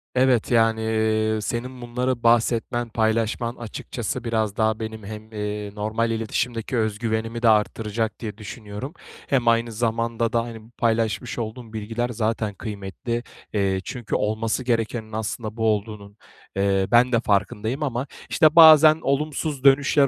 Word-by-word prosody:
Evet, 130 -3 +3
yani, 115 -1 +3
eee, 110 0 +1
senin 125 +3 -4
bunları 125 0 -2
bahsetmen, 115 0 +2
paylaşman, 115 +2 0
açıkçası 120 +1 -5
biraz 110 -3 -1
daha 110 0 +1
benim 110 -1 -6
hem, 110 +1 -9
eee, 105 -1 -4
normal 110 +2 -1
iletişimdeki 115 +2 -2
öz 110 -2 0
güvenimi 115 0 -2
de 115 - +5
arttıracak 110 +1 0
diye 110 -2 -6
düşünüyorum. 110 +5 -7 0.3
Hem 125 -4 +1
aynı 115 0 +3
zamanda 115 0 -1
da, 115 0 +2
hani, 115 -2 -8
bu 115 - -19
paylaşmış 115 0 0
olduğun 115 0 -6
bilgiler 115 +3 -3
zaten 110 -2 -1
kıymetli. 105 +4 -5 0.3
Eee, 95 -2 +1
çünkü 120 -3 -4
olması 110 +3 -1
gerekenin 115 -2 -1
aslında 110 +1 -4
bu 110 - 0
olduğunun, 105 -1 -2 0.4
eee, 95 -1 +1
ben 125 +2 +5
de 115 - +3
farkındayım 105 +6 0
ama, 130 0 -2 0.2
işte, 155 +1 +4
bazen 155 -1 +9
olumsuz 145 0 -1
dönüşler 140 0 +5
115 Hz, 145 wpm, -23 LUFS, 110-120 Hz, 0.4 s, bazen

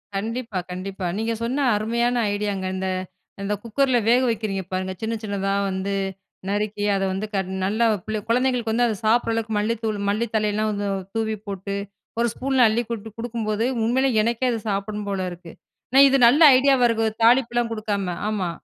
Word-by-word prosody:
கண்டிப்பா, 225 -1 -3
கண்டிப்பா. 190 +1 -5
நீங்க 225 +1 -1
சொன்ன 265 +4 0
அருமையான 235 +3 0 0.2
ஐடியாங்க. 205 -2 -2
இந்த, 190 0 -2 0.6
இந்த 205 +1 -1
குக்கர்ல 255 +2 +1
வேக 245 +2 +5
வைக்கிறீங்க 210 -4 -2
பாருங்க! 185 0 -2
சின்ன, 225 +1 -2
சின்னதா 195 -1 -1 0.2
வந்து 190 +1 -2 0.6
நறுக்கி 205 0 -2
அத 195 - 0
வந்து 190 +3 -2
கட் 190 -1 -1 0.2
நல்ல 215 +4 -1 0.2
பிள்ள 215 0 -2
குழந்தைங்களுக்கு 245 -1 +1
வந்து 245 +1 +3
அத 220 - -1
சாப்பிட்ற 230 +1 +3
அளவுக்கு 225 -1 -2
மல்லித்தூள், 220 0 -1
மல்லி 215 +3 0
தழையிலாம் 215 0 +1
வந்து 205 -1 -2 0.3
தூவி 220 -1 0
போட்டு, 200 0 -4 0.4
ஒரு 235 - +3
ஸ்பூன்ல 260 -1 +2
அள்ளி 225 +2 +1
போட்டு 225 -1 -5
கொடுக்கும்போது, 225 -1 -2 0.2
உண்மையிலே 260 +3 +2
எனக்கே 235 +2 0
அது 230 - -2
சாப்பிட்ணும் 205 +1 -3
போல 190 -2 -2
இருக்கு. 175 -1 -10 0.4
நான் 275 +1 +8
இது 275 - +4
நல்ல 280 +7 +4 0.2
ஐடியாவா 265 -2 +4
இருக்கு. 225 -1 +1 0.2
தாளிப்புலாம் 240 0 +3
குடுக்காம. 205 -5 -2
ஆமா. 195 -5 -1
220 Hz, 165 wpm, -23 LUFS, 200-235 Hz, 0.6 s, நான்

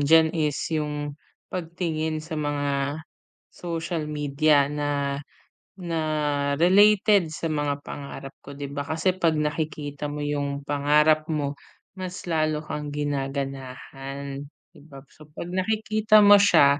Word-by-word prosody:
diyan 160 +3 +5
is 150 -4 0 0.2
'yong 150 -1 -2 0.4
pagtingin 160 -3 -2
sa 160 -2 -4
mga 145 -1 -1 0.8
social 165 -2 -4
media 145 -1 +2
na 145 -1 -1 0.6
na 170 -2 -2 0.6
related 200 +2 +5
sa 160 0 -3
mga 145 -1 -1
pangarap 140 -1 -7
ko, 140 0 -11
'di 140 -1 -6
ba? 145 0 -4
Kasi 160 +4 +1
'pag 165 -3 +3
nakikita 150 -1 -2
mo 145 0 -4
'yong 145 -1 -2
pangarap 150 +2 +3
mo, 145 -3 -2 0.4
mas 185 -1 -5
lalo 155 -2 0
kang 150 -1 -5
ginaganahan, 135 -1 -4 0.3
'di - - -18
ba? 135 -2 -12
So 155 -1 -16
'pag 170 +3 -8
nakikita 215 +2 +3
mo 205 0 +9
siya, 155 -7 +5
150 Hz, 125 wpm, -25 LUFS, 145-165 Hz, 0.8 s, mo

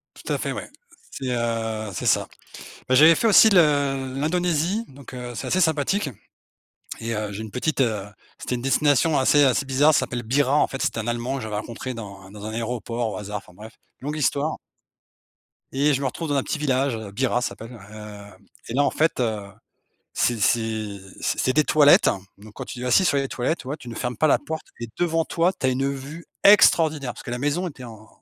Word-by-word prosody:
Tout - - -5
à - - 0
fait, - - -3
ouais, - - -6 0.4
c'est, 130 -2 -6
heu, 115 -2 -2
c'est - - -4
ça. - - +2 0.6
Bah, 130 - +3
j'avais 160 +4 +8
fait 230 - +1
aussi 220 +1 +7
le 140 -7 +2
l'Indonésie, 175 +6 0
donc 135 0 -13
heu, 125 -1 -6
c'est - - -5
assez 185 - +1
sympathique 160 +2 +1 0.9
et 115 0 -3
heu, 105 -1 -3
j'ai 100 - -6
une 110 - -9
petite, 140 +2 -1
heu, 110 -5 0 0.3
c'était 125 - -3
une 120 - -5
destination 145 +3 +2
assez 145 +2 +4
assez 135 0 +2
bizarre, 140 +4 +3
ça - - +3
s'appelle 120 -1 -4
Bira, 135 +4 +1
en - - +3
fait, 135 - -6
c'était 115 - -1
un 110 - -4
Allemand 120 +3 -2
que - - -5
j'avais 110 -1 -4
rencontré 115 +4 -5
dans 100 -4 -9
dans 105 0 -10
un 110 - -4
aéroport 115 0 -3
au - - -5
hasard, 105 0 -5
enfin 100 - -13
bref, 110 +3 -12 0.3
longue 150 +3 -4
histoire 145 +2 0 1.2
et 145 +2 +2
je 135 - -1
me 140 - -1
retrouve 165 +5 -4
dans - - +1
un 135 - +1
petit - - -3
village, 135 -3 0
heu, 110 -2 -7
Bira, 125 +3 0
ça - - 0
s'appelle. 115 +3 -10 0.2
Hem 105 -2 -11 0.3
et 115 - -5
là, 145 +2 +3
en - - +2
fait, 160 -3 0
heu, 110 -4 -1 0.7
c'est 120 -2 +1
c'est 110 -2 0 0.2
c - - -1
c'est 130 - +1
des 150 +2 +3
toilettes, 145 -1 +6 0.3
donc 105 +1 -14
quand - - -6
tu 120 - -8
es - - -5
assis 125 +9 +4
sur 145 - +2
les 135 -1 0
toilettes, 130 +8 -1
tu - - -12
vois, 140 +3 -3
tu 125 - -12
ne 115 - -7
fermes 125 +2 -3
pas 155 - +2
la 150 - +4
porte 160 +2 -6
et 120 - -5
devant 165 -2 +1
toi, 170 +3 +1
tu 135 - -3
as - - +3
une 135 +2 0
vue 140 +5 -8 0.2
extraordinaire 160 -9 +5
parce - - -12
que 130 - -7
la 120 - -3
maison 150 +7 -1
était 135 -4 -11
en 110 -2 -12
130 Hz, 225 wpm, -23 LUFS, 115-150 Hz, 1.2 s, j'avais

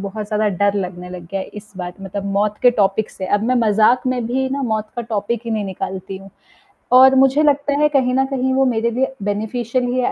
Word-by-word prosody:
बहुत 205 +2 -5
ज़्यादा 215 0 0
डर 200 0 +2
लगने 180 -2 -4
लग 180 -2 -9
गया 195 - -2
इस 210 0 -11
बात 180 -1 -6
मतलब 195 +1 -5
मौत 210 +1 0
के 245 - +7
टॉपिक 205 -1 0
से 190 - -6
अब 205 - -4
मैं 250 +2 +1
मजाक 220 +5 +3
में 250 -2 -1
भी 260 +3 -1
ना 275 +1 -2
मौत 220 -3 -2
का 240 - -2
टॉपिक 220 0 -2
ही 230 - -5
नहीं 215 -2 -1
निकालती 190 0 -5
हूँ 195 +1 -14 0.7
और 265 0 +7
मुझे 270 +3 +4
लगता 285 -1 +2
है 300 - +4
कहीं 260 -3 +1
न 265 0 +2
कहीं 260 -1 -1
वो 270 0 +3
मेरे 235 -2 0
लिए 265 +3 -1
बेनिफिशियल 230 +4 -2
ही 250 +1 -1
है 250 - +1
220 Hz, 230 wpm, -19 LUFS, 200-255 Hz, 0.7 s, के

